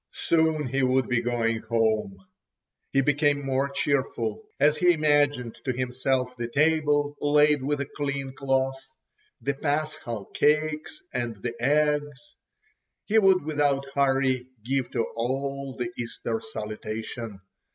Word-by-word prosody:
Soon 160 -2 +2
he 135 +2 -1
would 130 0 +2
be 120 -1 +1
going 115 -1 0
home. 110 -4 0 0.7
He 135 - +3
became 145 0 +2
more 135 +1 0
cheerful 140 - -1 0.2
as 150 +1 +5
he 180 -1 +5
imagined 145 -6 +1
to 130 - -1
himself 130 0 -1
the 120 -1 -3
table 145 +1 +2
laid 150 0 +4
with 145 +2 -1
a - - -1
clean 140 -2 -4
cloth, 135 0 0 0.6
the 140 - 0
paschal 145 -7 -2
cakes 155 - +1
and 120 -2 -2
the 120 - -2
eggs. 150 -1 +1 0.7
He 220 +1 +4
would 190 -6 +4
without 145 -3 +1
hurry 135 -2 +2 0.2
give 130 -1 0
to 115 - 0
all 135 +3 -2
the 120 -1 -3
Easter 120 - -4
salutation. 110 - -5
135 Hz, 130 wpm, -26 LUFS, 125-150 Hz, 0.7 s, as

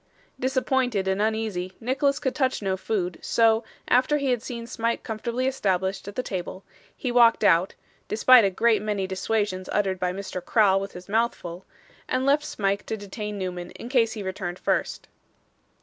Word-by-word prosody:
Disappointed 255 -5 0
and 190 +1 +1
uneasy, 215 -4 -1
Nicholas 275 +3 +1
could 260 -3 -1
touch 260 -6 0
no 190 -1 0
food, 190 -2 -2
so, 225 0 +3 0.2
after 260 +5 +3
he 280 -3 0
had 245 -3 0
seen 235 -2 -6
Smike 230 -1 -2
comfortably 235 +3 -3
established 195 -8 -1
at 200 - -7
the 255 - -1
table, 185 -1 -5 0.3
he 250 - -2
walked 235 -2 +5
out 185 -2 +4 0.3
(despite 235 +3 +6
a 200 - +3
great 220 +2 +2
many 210 -2 -1
dissuasions 190 0 -2
uttered 195 -3 0
by 180 -1 0
Mr. 185 -1 -6
Crowl 200 -4 +4
with 195 - -6
his 180 +1 -10
mouth 225 +3 +1
full), 175 +2 -9 0.4
and 255 +1 0
left 290 +2 +3
Smike 200 -7 -1
to 220 - -2
detain 210 +1 -6
Newman 180 -2 -4
in 235 - -8
case 235 -4 +2
he 215 -2 -6
returned 185 -2 -4
first. - - -1
215 Hz, 175 wpm, -25 LUFS, 190-245 Hz, 0.4 s, despite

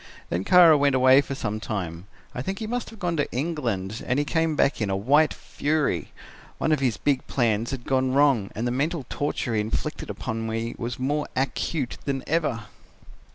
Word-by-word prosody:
Then 90 +2 -1
Kara 165 - +7
went 140 -1 +3
away 130 +1 +6
for 135 -1 -5
some 110 -4 -3
time. 90 -5 -5 0.3
I 125 - -4
think 190 +8 -3
he 220 - -4
must 240 +2 -3
have 225 - -12
gone 175 -4 -1
to 145 - -1
England, 120 - -2
and 125 - +1
he 145 - +1
came 160 +1 0
back 140 -4 +2
in 105 - 0
a 95 - 0
white 145 +9 +4
fury. 145 - -1 0.5
One 160 - 0
of 155 - +3
his 125 -5 0
big 140 -3 0
plans 115 -3 +1
had 130 -3 -5
gone 130 -1 +1
wrong 135 -7 +3
and 115 - -2
the 120 - 0
mental 145 +3 -1
torture 145 -4 -2
he 105 - +2
inflicted 110 +1 -3
upon 115 0 -4
me 115 +1 -3
was 120 +1 -3
more 145 +3 -1
acute 135 +1 -1
than 135 -2 -2
ever. 150 -8 0
130 Hz, 200 wpm, -25 LUFS, 115-150 Hz, 0.5 s, Kara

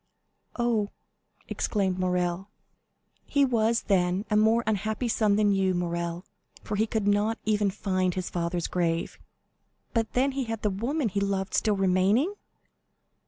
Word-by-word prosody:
'" - - -49
"Oh!" 230 -4 +1 0.6
exclaimed 190 -3 -1
Morrel. 180 +1 -1 0.7
"He 280 -1 +2
was, 230 -2 +1
then, 185 0 +1
a - - +3
more 220 +2 +4
unhappy 215 +3 -1
son 215 -2 +2
than 205 -1 +3
you, 190 -2 +2
Morrel, 170 0 -3 0.4
for 210 - -3
he 220 +2 +1
could 220 -2 -1
not 205 +2 +2
even 210 -1 +2
find 185 -2 -1
his 185 -1 -3
father's 170 0 -2
grave." 170 -2 -1 0.7
"But 225 -2 0
then 265 +3 +2
he 270 -1 -2
had 225 -1 -5
the 210 - +2
woman 240 +7 -1
he 200 - -1
loved 195 -1 -1
still 210 -1 +2
remaining?" 195 - +2
205 Hz, 150 wpm, -27 LUFS, 185-220 Hz, 0.7 s, more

